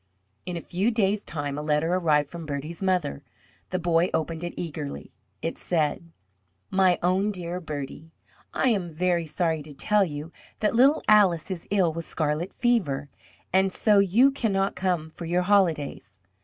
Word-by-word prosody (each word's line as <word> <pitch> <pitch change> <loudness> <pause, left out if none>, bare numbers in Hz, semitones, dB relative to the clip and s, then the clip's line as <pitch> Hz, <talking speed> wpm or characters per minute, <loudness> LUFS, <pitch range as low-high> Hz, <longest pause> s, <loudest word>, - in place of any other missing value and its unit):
In 180 -1 -3
a - - -5
few 190 +8 0
days' 210 -3 +1
time 145 -2 -4
a - - -3
letter 150 +3 +1
arrived 155 -5 +2
from 165 +1 -8
Bertie's 150 +4 -5
mother. 185 - 0 0.5
The 185 - -1
boy 175 0 +2
opened 165 +1 -2
it 175 - -5
eagerly. 150 -4 -6 0.3
It 165 - -3
said: 165 0 -1 0.6
My 190 -2 +4
own 185 +3 +2
dear 180 -2 -4
Bertie: 150 0 -6 0.4
I 260 - +1
am 195 -7 0
very 170 0 0
sorry 160 -1 0
to 150 0 -11
tell 210 +8 +2
you 155 -1 -5 0.3
that 210 - +1
little 275 +6 +4
Alice 195 -5 +4
is 175 -3 -6
ill 185 -5 +2
with 165 0 -5
scarlet 155 +4 -2
fever. 160 - 0 0.4
And 190 0 +3
so 210 +1 +3
you 215 +8 +5
cannot 200 -7 0
come 175 -4 -1
for 170 - -8
your 175 +2 +1
holidays. 180 -7 +1
175 Hz, 165 wpm, -26 LUFS, 155-195 Hz, 0.6 s, you